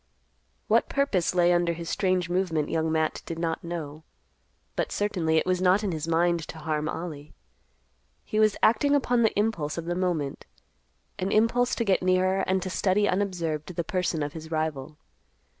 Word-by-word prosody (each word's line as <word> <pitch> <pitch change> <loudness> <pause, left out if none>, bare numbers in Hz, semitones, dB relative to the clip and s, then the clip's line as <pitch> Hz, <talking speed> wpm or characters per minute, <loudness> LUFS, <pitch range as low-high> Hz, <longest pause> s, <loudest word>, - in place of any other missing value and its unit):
What - - +3
purpose 205 -12 +1
lay 175 0 +4
under 175 -1 +2
his 170 0 -7
strange 185 -1 0
movement 175 -4 0
Young 160 0 0
Matt 160 -1 0
did 165 - -4
not 165 -1 -2
know. 160 -3 -6 0.7
But - - -1
certainly 175 -6 0
it - - +2
was 185 0 0
not 185 +3 +4
in 200 - -1
his 160 -1 -4
mind 170 +1 +2
to - - -8
harm 155 0 -2
Ollie. 155 -3 -6 0.9
He 215 - -1
was 215 -1 +3
acting 280 +6 +4
upon 245 -4 +2
the 220 -3 +2
impulse 175 -9 -1
of 170 - -4
the 175 - -1
moment; 175 -6 -2 0.7
an 190 +1 -1
impulse 235 +3 +2
to 235 - -1
get 195 -2 +2
nearer 185 +1 +2
and 190 0 +1
to 190 - -4
study 200 +2 +2
unobserved 180 -4 -2
the 170 - -1
person 175 -3 -1
of 145 0 -4
his 160 -1 -8
rival. 155 -2 -3
175 Hz, 175 wpm, -26 LUFS, 160-190 Hz, 0.9 s, lay